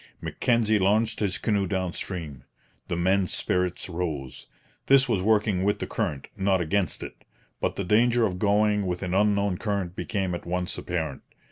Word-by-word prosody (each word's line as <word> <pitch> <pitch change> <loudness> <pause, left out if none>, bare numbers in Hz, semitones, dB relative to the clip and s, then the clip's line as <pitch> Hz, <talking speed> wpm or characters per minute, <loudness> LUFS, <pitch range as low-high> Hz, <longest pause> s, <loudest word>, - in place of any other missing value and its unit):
Mackenzie 110 -3 +1
launched 110 +4 +2
his 100 -3 0
canoe 100 -3 0
down 95 -2 -1
stream. 80 -8 -5 0.4
The - - -2
men's 95 +1 +2
spirits 90 -1 -1
rose. 80 -7 -4 0.4
This 135 0 +6
was 110 -6 +1
working 105 -2 +2
with 105 +1 +2
the - - -4
current, 85 -11 -3
not 95 -1 +2
against 90 +1 -1
it; - - -10 0.4
but - - -1
the 100 - -2
danger 115 +5 +3
of 90 -3 -2
going 105 0 +2
with 90 +1 -3
an 90 -1 -2
unknown 100 -1 +2
current 100 -5 -2
became 95 -5 -2
at 85 - -6
once 90 0 -1
apparent. 80 -6 -3
95 Hz, 165 wpm, -26 LUFS, 90-105 Hz, 0.4 s, This